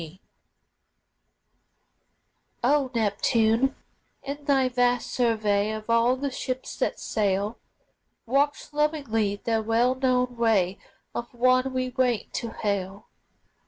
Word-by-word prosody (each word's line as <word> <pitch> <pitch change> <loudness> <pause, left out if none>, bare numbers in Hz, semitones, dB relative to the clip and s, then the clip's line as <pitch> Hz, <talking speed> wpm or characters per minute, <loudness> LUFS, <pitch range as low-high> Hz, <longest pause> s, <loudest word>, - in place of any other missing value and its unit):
G. 165 +3 -10 2.4
O 275 +1 +3
Neptune, 225 +3 +2 0.5
in 285 +1 -6
thy 270 -3 +3
vast 245 -1 +1
survey 215 -4 +1
Of 215 +1 -4
all 230 +2 +4
the 275 +1 -3
ships 255 0 -4
that - - -1
sail, 205 +1 -1 0.7
Watch 285 +4 0
lovingly 280 -9 0
the 225 +2 -1
well 230 +3 +2
known 250 -2 0
way 200 -5 +2 0.3
Of 240 - -5
one 255 +2 +3
we 255 0 -1
wait 250 -4 0
to 235 - -3
hail. 200 -2 -3
240 Hz, 110 wpm, -26 LUFS, 215-260 Hz, 2.4 s, all